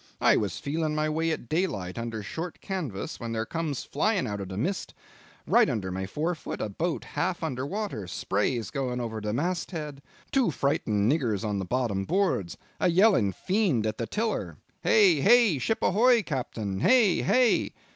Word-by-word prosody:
I - - +5
was 100 -5 -1
feeling 155 +1 -2
my 155 0 +1
way 160 +2 0
in - - +2
at - - -17
daylight 115 - -2
under 115 -2 -4
short 165 - -6
canvas 160 - -4
when 115 -1 -4
there 110 0 -1
comes 160 -3 -3
flying 195 +4 0
out 105 -3 -4
of 95 - -6
the 95 - -6
mist 185 - -2 0.5
right - - +4
under 95 -4 -2
my 95 +1 -3
forefoot 160 - -3
a 110 - -2
boat 165 - -2
half 185 -2 -2
under 135 -4 -2
water, 195 - -4
sprays 100 +5 -1
going 125 -2 -2
over 110 -2 -4
the 105 0 -2
mast 170 +9 -1
head, 150 -5 -6 0.3
two 265 -7 +3
frightened 115 -7 +1
niggers 115 - 0
on 100 -1 -1
the 95 - -3
bottom 110 -4 -1
boards, 175 - 0 0.2
a - - +3
yelling 180 - +4
fiend 180 - 0
at 110 0 -2
the 115 - -2
tiller. 210 - -2 0.2
Hey! 190 -8 +5
hey! 220 - +5
Ship 225 - 0
ahoy! 185 - +2
ahoy! 240 -1 +5
Captain! 115 - -3
Hey! 220 - +4
hey! 245 - +3
140 Hz, 185 wpm, -27 LUFS, -, 0.5 s, I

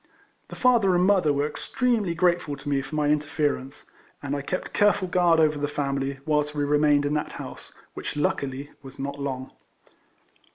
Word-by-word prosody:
The - - -9
father 230 -7 +4
and 180 +1 +3
mother 185 -6 +4
were 145 0 +1
extremely 215 - -1
grateful 175 -4 +1
to 135 - -12
me 140 -1 +1
for 135 +3 -7
my 150 -1 +1
interference, 150 -2 -1 0.4
and 145 0 -2
I 140 - -2
kept 180 +6 -4
careful 205 -2 +3
guard 175 -2 +3
over 155 -2 +3
the 145 - 0
family 140 -1 -2
whilst 150 -1 0
we 145 - 0
remained 145 0 +3
in 145 - 0
that 150 - -2
house, - - -9 0.2
which - - -5
luckily 140 -1 -2
was 135 0 -12
not 140 +1 -5
long. 130 -2 -4
150 Hz, 175 wpm, -25 LUFS, 140-175 Hz, 0.4 s, father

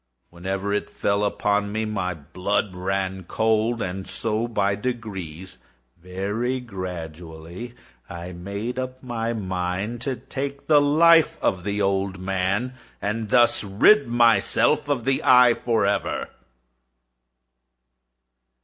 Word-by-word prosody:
Whenever 95 +3 -3
it 105 - -1
fell 100 +1 0
upon 100 0 0
me, 110 +1 -1
my 100 -4 -2
blood 90 +6 -2
ran 95 0 -2
cold; 110 +3 +1
and 95 +1 -5
so 110 +4 -2
by 100 -4 +1
degrees—very 95 - -5
gradually—I 85 - -8
made 100 +8 -5
up 130 0 -5
my 115 -2 -2
mind 95 +2 -3
to 135 +1 -1
take 135 +3 -6
the 150 -2 +5
life 160 +2 +5
of 90 -2 0
the 100 +1 -1
old 95 -1 0
man, 95 +6 -1 0.3
and 105 +1 -3
thus 120 +1 +4
rid 105 - +4
myself 120 +4 +3
of 130 -5 0
the 135 0 +1
eye 125 -1 +7
forever. 100 -5 0
100 Hz, 110 wpm, -24 LUFS, 95-120 Hz, 0.3 s, eye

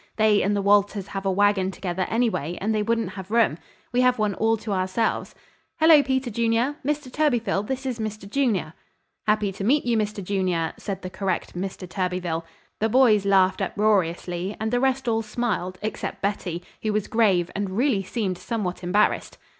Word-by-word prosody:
They 215 -2 +4
and 205 +2 +1
the 200 - -1
Walters 200 0 +2
have 195 0 -4
a - - +3
wagon 200 -1 +2
together, 185 -1 -3
anyway, 220 - 0
and 215 +3 0
they 215 - +1
wouldn't 225 -2 0
have 190 0 -8
room. 220 -8 +2 0.3
We 245 +1 +2
have 250 0 +3
one 210 -2 +1
all 225 +3 +1
to 210 -1 -4
ourselves. 190 +4 -1 0.4
Hello, 315 -2 +7
Peter 260 -2 -1
Junior! 235 +5 +1
Mr. 295 -1 -2
Thurbyfil, 230 -9 +1
this 265 0 -3
is 250 -3 -3
Mr. 215 -2 -5
Junior." 205 - 0 0.5
"Happy 210 -1 +2
to 195 - -6
meet 275 +7 +2
you, 240 -1 +2
Mr. 210 -2 -2
Junior," 180 -4 -1
said 195 -2 -5
the 185 - -5
correct 190 -3 -3
Mr. 185 0 -5
Thurbyfil. 180 -3 -2 0.4
The 220 - +1
boys 220 -5 +4
laughed 190 0 +3
uproariously, 185 -2 0
and 220 0 -2
the 245 - +2
rest 265 0 0
all 225 -1 +2
smiled, 215 -5 -2
except 215 - -4
Betty, 180 -4 -2 0.2
who 215 -1 -1
was 210 -1 -1
grave 195 -7 +2
and 200 -1 -2
really 245 -5 +2
seemed 195 -2 -3
somewhat 195 -6 -3
embarrassed. 190 +4 +1
205 Hz, 180 wpm, -24 LUFS, 190-230 Hz, 0.5 s, Hello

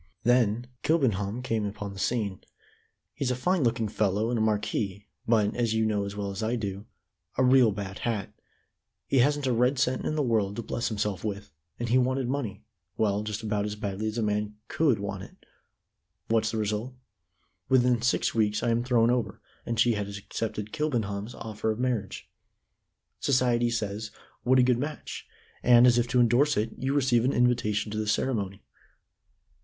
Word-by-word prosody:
"Then 120 -1 +3 0.2
Kilbenham 120 - +1
came 115 -3 -1
upon 100 -1 -5
the 95 - -9
scene. 105 -6 -1 0.7
He's 140 -3 -2
a 125 - +1
fine 180 +8 +1
looking 115 -2 +1
fellow 105 +2 0
and 120 - 0
a - - +1
marquis, 105 -2 -1 0.2
but, 110 -3 +2
as 115 -2 0
you 110 0 +2
know 105 -2 0
as 100 0 -6
well 100 -1 -3
as 95 - -5
I 110 +2 0
do, 100 -3 -4 0.5
a 130 - +3
real 125 -3 +6
bad 100 -1 -6
hat. 110 -5 -2 0.7
He 135 - +2
hasn't 145 +3 +2
a 130 - +2
red 125 +4 +2
cent 130 0 +1
in 155 - -1
the 150 - +1
world 110 -5 +1
to 115 - -4
bless 120 - -2
himself 105 -3 -2
with, 105 -1 -4 0.3
and 120 -1 -2
he 125 +2 +4
wanted 130 0 0
money 120 -7 -3 0.3
well 105 -2 +1
just 105 +1 -4
about 105 -2 0
as 105 0 -3
badly 105 0 -3
as 110 +1 -3
a 115 - 0
man 105 0 -1
could 145 -8 +2
want 100 0 -4
it. - - -13 0.8
What's 110 -1 +2
the 110 - -3
result? 110 +4 -2 0.7
Within 125 -2 +4
six 125 - +1
weeks 105 -2 +1
I 120 - +2
am 115 +1 +1
thrown 120 -2 +3
over, 125 -2 -1 0.3
and 115 -1 -2
she 120 +1 +5
has 100 -1 -4
accepted 105 0 -5
Kilbenham's 115 -7 -2
offer 110 0 -4
of 110 - -1
marriage. 120 -6 -2 0.9
Society 120 -3 +2
says 110 -1 -3 0.3
'What 130 +1 +3
a 125 - +6
good 125 -1 +3
match!' 150 +3 -5 0.3
and, 120 0 +7
as 120 -1 +5
if 120 - +1
to 125 +1 +2
endorse 125 +5 +4
it, 110 +2 0
you 135 +2 -1
receive 125 -4 +3
an 130 - +1
invitation 115 -4 +1
to 110 - -2
the 110 - -2
ceremony." 105 -4 -1
115 Hz, 185 wpm, -27 LUFS, 105-125 Hz, 0.9 s, and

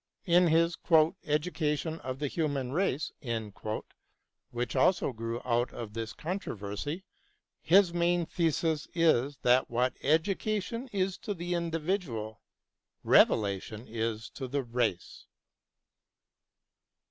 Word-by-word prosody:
In 175 -1 +5
his 165 +1 +3 0.2
" 165 +5 -2
Education 155 0 -1
of 130 0 -5
the 145 +1 -2
Human 140 -4 -1
Race," 155 -3 0 1.4
which 120 +1 -3
also 135 0 +3
grew 115 +1 -4
out 120 0 +1
of 110 -3 -7
this 115 0 -4
controversy, 150 - -4 0.6
his 185 0 +5
main 175 0 +2
thesis 160 -2 0
is 145 -5 +3
that 125 +1 +4
what 125 +2 +1
education 205 - 0
is 190 -1 -1
to 205 - -4
the 175 0 -3
individual, 165 - -2 0.6
revelation 105 +2 +3
is 110 0 -3
to 130 - -6
the 140 +2 -1
race. 115 -7 -2
150 Hz, 110 wpm, -30 LUFS, 120-175 Hz, 1.4 s, In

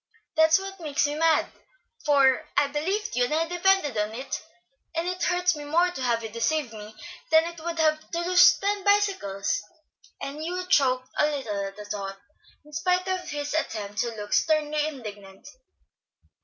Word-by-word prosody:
That's 320 0 +6
what 390 0 -7
makes 300 -4 0
me 290 - -1
mad; 320 +1 +3 0.6
for 280 -1 +4
I 285 - +5
believed 365 - -2
you 245 0 +3
and 315 +5 0
depended 355 -5 +2
on 210 +1 -2
it, 260 +3 -4 0.5
and 330 +2 -1
it 365 0 -3
hurts 360 -1 +2
me 295 - -7
more 340 +5 +2
to 310 - -7
have 235 -2 0
you 225 - -5
deceive 230 +3 -1
me 215 0 -10 0.3
than 320 0 +6
it 335 -1 -7
would 340 0 -3
to 310 -1 +3 0.2
lose 360 +1 +6
ten 405 0 -1
bicycles;" 395 - +1 0.6
and 280 +2 -6
Hugh 360 +3 -3
choked 255 -6 +3
a 300 - +5
little 225 -9 -3
at 195 - -10
the 210 - -8
thought, 195 -1 -5 0.5
in 300 - -17
spite 360 +4 +1
of 370 -1 -2
his 290 0 -4
attempt 210 -9 -3
to 235 -1 -1
look 205 -1 -5
sternly 305 -1 +2
indignant. 205 -9 -9
300 Hz, 170 wpm, -26 LUFS, 235-345 Hz, 0.6 s, That's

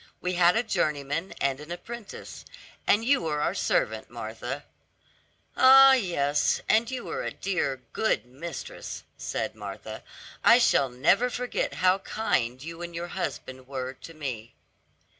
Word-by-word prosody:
We 180 0 -2
had 175 +1 +5
a 225 - +2
journeyman 150 - -1
and 135 -1 0
an 150 +3 -10
apprentice, 210 +5 -8 0.4
and 225 +2 +4
you 280 +2 +3
were 155 -3 -1
our - - +1
servant, 110 0 0
Martha." 120 +4 -6 0.9
"Ah, 270 +1 +9
yes, 160 - +1
and 225 +1 +3
you 255 -2 -4
were - - -4
a - - -2
dear, 140 -9 -2
good 220 - +1
mistress," 170 - -7
said - - -3
Martha, - - -8 0.4
"I 235 - +8
shall 140 - +3
never 170 - +3
forget 250 +1 -2
how 185 +1 +5
kind 130 - -1
you 165 +2 -7
and 170 -1 -6
your 170 +1 -4
husband 130 -8 -5
were 130 -1 -4
to 165 +5 -12
me." 125 -7 -6
165 Hz, 145 wpm, -27 LUFS, 135-220 Hz, 0.9 s, Ah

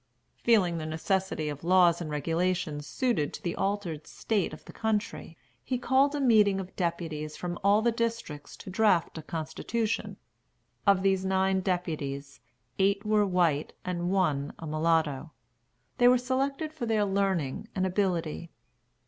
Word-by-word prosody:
Feeling 185 -8 +3
the 155 - -4
necessity 160 0 -1
of 145 0 -5
laws 175 -1 +4
and 160 - -4
regulations 160 0 -1
suited 235 - 0
to - - -11
the 170 - -2
altered 195 -6 -2
state 210 -5 -1
of - - -11
the - - -11
country, 210 -6 -2 0.3
he 255 - -1
called 270 +3 +2
a - - -1
meeting 215 -7 +4
of 190 -1 -7
deputies 160 -4 -3
from 175 +1 -4
all 205 +2 +4
the 235 - +3
districts 230 - -4
to 190 - -9
draft 185 -5 +2
a - - -6
constitution. 210 +9 -3 0.7
Of 195 -1 +5
these 190 -1 +2
nine 190 0 +2
deputies 145 -7 -3 0.4
eight 200 +2 +2
were 210 -1 +3
white 170 -5 +1
and 175 -1 -2
one 155 -7 +1
a 165 - -8
mulatto. 155 -1 0 0.7
They 245 - +6
were 250 +1 +6
selected 275 +5 -1
for 280 -7 -4
their 215 -2 +2
learning 195 -4 -1
and 190 -1 +1
ability. 175 -4 -1
185 Hz, 150 wpm, -28 LUFS, 160-210 Hz, 0.7 s, They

